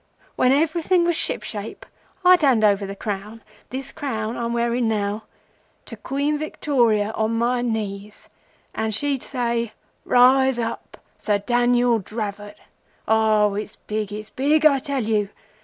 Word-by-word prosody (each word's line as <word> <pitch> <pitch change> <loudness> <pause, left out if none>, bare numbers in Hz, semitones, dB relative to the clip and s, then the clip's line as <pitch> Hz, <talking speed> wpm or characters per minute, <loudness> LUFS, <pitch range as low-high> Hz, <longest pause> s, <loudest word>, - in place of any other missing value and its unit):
When 255 - +3
everything 330 +5 +2
was 340 -1 +1
ship - - -2
shape, - - -7 0.4
I'd 360 -1 +7
hand 260 -7 +3
over 200 -1 +3
the 195 - -6
crown—this 215 +6 -7
crown 230 -7 -4
I'm 235 0 -3
wearing 235 0 0
now—to 210 0 -6
Queen 285 +2 -2
Victoria 235 -9 +1
on 220 +1 -1
my 240 +1 +1
knees, 210 -3 -4 0.5
and 220 -1 -1
she'd 275 +2 0
say:—"Rise 245 +1 +1
up, 230 -1 -5 0.2
Sir 205 -1 +1
Daniel 240 +2 +2
Dravot." 205 0 -6 0.5
Oh, 215 -2 +3
its 210 +1 -5
big! 210 -1 -4
It's 210 +1 -7
big, 300 +4 +2
I 280 -3 +6
tell 275 -2 -2
you! 210 -2 0
230 Hz, 130 wpm, -22 LUFS, 215-265 Hz, 0.5 s, I'd